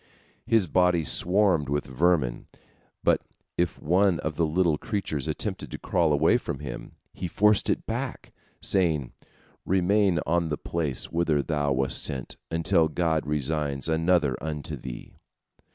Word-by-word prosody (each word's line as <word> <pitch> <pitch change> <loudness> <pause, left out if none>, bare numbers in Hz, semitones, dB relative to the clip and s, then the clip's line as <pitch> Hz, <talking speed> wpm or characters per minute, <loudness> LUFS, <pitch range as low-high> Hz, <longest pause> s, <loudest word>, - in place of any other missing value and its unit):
His 115 -4 +3
body 90 0 +2
swarmed 90 -2 +2
with 75 +1 -1
vermin, 70 -2 0 0.6
but - - +3 0.3
if 85 -2 -1
one 90 +2 +2
of 80 -1 -3
the 80 0 +1
little 80 -1 +1
creatures 80 -10 -3
attempted - - -3
to - - -6
crawl 85 -3 +1
away 75 +2 +3
from - - -5
him, - - -8 0.2
he 90 - -4
forced 105 +3 +3
it - - 0
back, - - -5 0.3
saying, 80 -9 +1 0.5
"Remain 95 -1 +2
on 85 +1 +1
the 75 - -2
place 75 -6 -2
whither 80 -4 +1
thou 75 -2 -1
wast 65 0 +1
sent, 65 -3 -2
until 85 0 +2
God 80 -2 -1
assigns 75 -1 -1
another 80 -3 +2
unto 75 -2 -4
thee." - - -9
80 Hz, 140 wpm, -26 LUFS, 75-90 Hz, 0.6 s, His